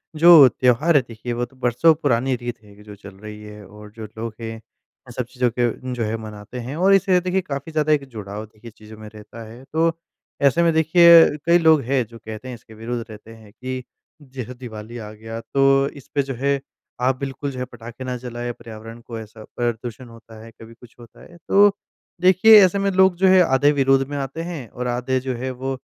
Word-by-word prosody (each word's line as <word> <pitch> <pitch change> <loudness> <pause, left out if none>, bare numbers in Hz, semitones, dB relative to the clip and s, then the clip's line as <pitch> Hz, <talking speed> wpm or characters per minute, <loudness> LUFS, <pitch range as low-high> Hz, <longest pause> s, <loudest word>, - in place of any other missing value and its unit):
जो 160 -4 +8
त्यौहार 130 +7 +1
है 140 - +6
देखिए, 120 +1 -6
वो 120 +1 -2
तो 130 - -23
बरसों 125 +6 +3
पुरानी 130 -4 0
रीत 120 -1 -7
है 100 -1 -18
कि 105 - -17
जो 105 -1 -12
चल 100 -1 -13
रही 105 +1 -11
है, 105 -1 -11
और 105 +2 -14
जो 110 - -7
लोग 115 0 -5
हैं, 115 0 -5
इन 110 - -20
सब 125 - -2
चीज़ों 125 0 -1
को 125 +1 -2
जो 120 -2 -3
है, 110 +1 -3
मनाते 110 +2 -9
हैं, 130 +5 -6
और 195 +2 +4
इससे 190 -2 +3
देखिए, 185 +1 -1
काफ़ी 145 -2 -6
ज़्यादा 155 0 +1
एक 140 -2 -1
जुड़ाव, 105 +1 -7
देखिए, 110 +2 -15
चीज़ों 110 0 -15
में 110 0 -11
रहता 110 +2 -11
है। 120 +3 -13
तो 165 +1 +2 0.5
ऐसे 140 +5 +3
में 165 -1 +3
देखिए, 165 +1 +7 0.2
कई 170 +1 +5
लोग 160 -3 +4
हैं 130 -3 +2
जो 115 0 -13
कहते 110 +3 -9
हैं 125 - -6
इसके 110 -1 -17
विरुद्ध 115 +2 -5
रहते 110 +1 -12
हैं 110 -2 -17
कि, 130 0 -6 0.4
जैसे 130 -3 -8
दिवाली 120 -2 -9
आ 105 -2 -8
गया, 115 +1 -8
तो 135 +1 +2
इसपे 140 +2 -2
जो 135 0 -5
है, 140 +2 0 0.4
आप 130 +1 +2
बिल्कुल 140 +1 -5
जो 130 - -8
है, 125 - -3
पटाखे 120 +1 -11
ना 125 -1 -4
जलाएँ। 120 0 -6
पर्यावरण 115 +1 -11
को 115 -1 -9
ऐसा 110 0 -12
प्रदूषण 120 +1 -4
होता 115 -1 -15
है, 115 - -12
कभी 115 +1 -12
कुछ 120 0 -18
होता 120 - -16
है। 175 - -16
तो 205 +1 +6 0.5
देखिए, 190 +4 +7
ऐसे 195 +2 -1
में 195 0 0
लोग 190 -1 +4
जो 190 +1 +3
हैं 185 0 +6
आधे 140 0 +3
विरोध 135 0 +3
में 145 - -4
आते 140 +4 -5
हैं, 145 -9 -7
और 125 0 -5
आधे 125 +2 -1
जो 130 0 -4
हैं, 130 +2 -4
वो 130 +1 -4
125 Hz, 225 wpm, -21 LUFS, 115-145 Hz, 0.5 s, जो